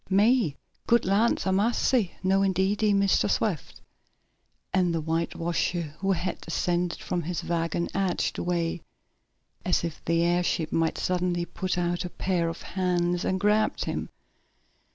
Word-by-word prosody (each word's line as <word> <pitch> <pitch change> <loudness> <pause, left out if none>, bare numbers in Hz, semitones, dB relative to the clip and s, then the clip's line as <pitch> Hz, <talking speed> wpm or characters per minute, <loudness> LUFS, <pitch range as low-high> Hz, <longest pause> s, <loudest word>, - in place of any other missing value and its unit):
"Me? 205 - +3 0.3
Good 235 0 +4
land 200 +5 +2
a' 190 - +2
massy! 220 +1 +2
No 190 +1 +3
indeedy, 195 +2 +2
Mistah 200 -1 +3
Swift," - - -1 0.9
and 180 -3 +2
the - - 0
whitewasher, 165 0 -1
who 195 0 +1
had 180 0 -3
descended 175 +1 -1
from 175 - -1
his 170 0 -3
wagon, 170 0 -1
edged 195 -2 0
away, 170 -1 -1 0.8
as 180 - +1
if 165 -2 -5
the 165 0 +2
airship 175 -2 +1
might 165 -1 +1
suddenly 180 -1 0
put 185 +1 -3
out 175 0 0
a 180 - -4
pair 175 -2 -1
of 165 - -7
hands 175 -1 0
and 185 - 0
grab 210 +2 +2
him. - - -3
180 Hz, 140 wpm, -27 LUFS, 170-195 Hz, 0.9 s, Good